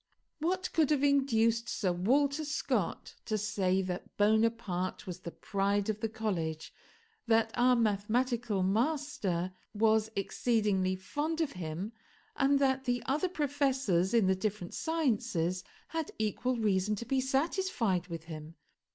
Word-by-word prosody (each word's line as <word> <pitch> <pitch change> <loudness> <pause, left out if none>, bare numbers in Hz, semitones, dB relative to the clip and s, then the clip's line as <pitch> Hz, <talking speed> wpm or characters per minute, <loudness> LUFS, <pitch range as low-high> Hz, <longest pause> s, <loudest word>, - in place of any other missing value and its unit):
What 370 +4 -1
could 315 -4 +3
have 290 -2 +2
induced 235 -5 +3
Sir 190 -5 0
Walter 280 - +2
Scott 290 -1 -2
to 215 - 0
say 195 -3 +1
that 180 -1 -6
Bonaparte 210 -4 +1
was 180 -2 -6
the - - -6
pride 200 +3 -1
of 215 - -7
the 225 - -1
college, 170 -8 -3 0.5
that 225 -1 +3
our 250 +1 +4
mathematical 225 0 +1
master 205 - 0 0.2
was 220 0 +3
exceedingly 200 -2 +1
fond 295 - -3
of 320 -3 0
him, 180 +4 -5 0.4
and 280 +1 +3
that 265 -1 +1
the 245 -1 0
other 300 +7 +1
professors 270 - +1
in 225 -4 +5
the 190 - +4
different 190 -2 -3
sciences 230 - 0 0.3
had 325 -2 -3
equal 240 +4 0
reason 210 -2 +1
to 235 - -6
be 265 +2 +1
satisfied 265 - 0
with 165 -3 -6
him? 160 -1 -9
220 Hz, 135 wpm, -31 LUFS, 190-265 Hz, 0.5 s, in